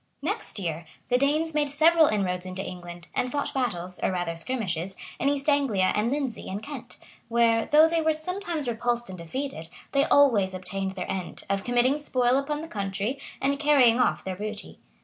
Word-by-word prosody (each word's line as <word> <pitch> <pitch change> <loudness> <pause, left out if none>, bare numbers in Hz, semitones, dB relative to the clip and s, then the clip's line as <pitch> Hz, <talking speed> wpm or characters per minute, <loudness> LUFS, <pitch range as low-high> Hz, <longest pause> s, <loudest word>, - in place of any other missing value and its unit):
] - - -46
Next 440 - -4
year, 165 -3 -3 0.2
the 245 - +4
Danes 305 +4 +2
made 295 -1 +1
several 320 +2 +5
inroads 185 -5 0
into 185 +1 -4
England, 175 -1 -8
and 250 - -1
fought 285 +1 -1
battles, 180 -9 -2
or - - +1
rather 175 -2 -2
skirmishes, 190 -2 -2 0.2
in 275 - +2
East 285 0 -1
Anglia 270 -11 +3
and 215 +3 +1
Lindesey 270 -5 -3
and 200 +3 -5
Kent; 285 -4 -8 0.3
where, 230 -1 +3
though 305 +2 +7
they 330 0 +1
were 315 0 +3
sometimes 335 -2 -4
repulsed 240 0 -1
and 185 - -7
defeated, 170 - -5 0.2
they 275 +1 +3
always 220 -12 +4
obtained 190 +1 -3
their 185 -2 -4
end, 185 -2 -5
of 195 0 0
committing 245 +4 +2
spoil 255 -3 +2
upon 295 +2 -3
the - - -6
country, 200 +3 -3 0.2
and 280 +1 0
carrying 270 -6 +5
off 250 - +2
their 190 -1 -4
booty. 210 +2 -7
240 Hz, 190 wpm, -26 LUFS, 190-285 Hz, 0.3 s, though